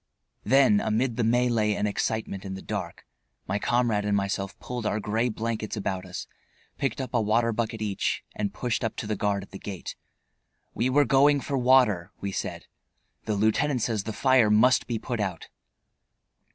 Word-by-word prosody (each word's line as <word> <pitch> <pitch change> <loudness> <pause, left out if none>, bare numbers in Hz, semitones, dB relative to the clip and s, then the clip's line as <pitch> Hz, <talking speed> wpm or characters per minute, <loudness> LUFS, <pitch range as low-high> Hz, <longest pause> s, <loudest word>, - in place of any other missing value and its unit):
Then 130 -6 +5
amid 115 +3 0
the 120 - -1
mêlée 115 -2 +2
and 105 - 0
excitement 105 -1 -2
in 95 -1 -5
the 95 - -8
dark - - -5 0.4
my 100 +2 -1
comrade 120 -3 +1
and 100 0 +1
myself 100 0 -3
pulled 125 -1 -5
our 105 - 0
gray 110 +4 0
blankets 110 -1 -3
about 95 -2 -3
us, 90 - -6 0.5
picked 135 - -1
up 130 -1 -5
a 120 - +3
water 115 +2 +2
bucket 110 -1 -2
each, 100 -2 -1
and 100 -2 -2
pushed 120 +3 -2
up 115 - -2
to - - -5
the 105 0 -1
guard 100 -1 -1
at - - -15
the 95 - -8
gate. 95 -4 -7 0.8
We 120 +4 0
were 145 +2 +4
"going 140 +3 +4
for 140 - -3
water," 125 -8 +3
we 100 - -3
said. - - -4 0.6
"The 110 - -1
lieutenant 110 +5 +1
says 110 -4 -1
the 110 - -3
fire 130 -1 +4
must 110 +5 +4
be 120 - -1
put 120 +1 -4
out." 95 -5 -3
110 Hz, 180 wpm, -26 LUFS, 105-125 Hz, 0.8 s, Then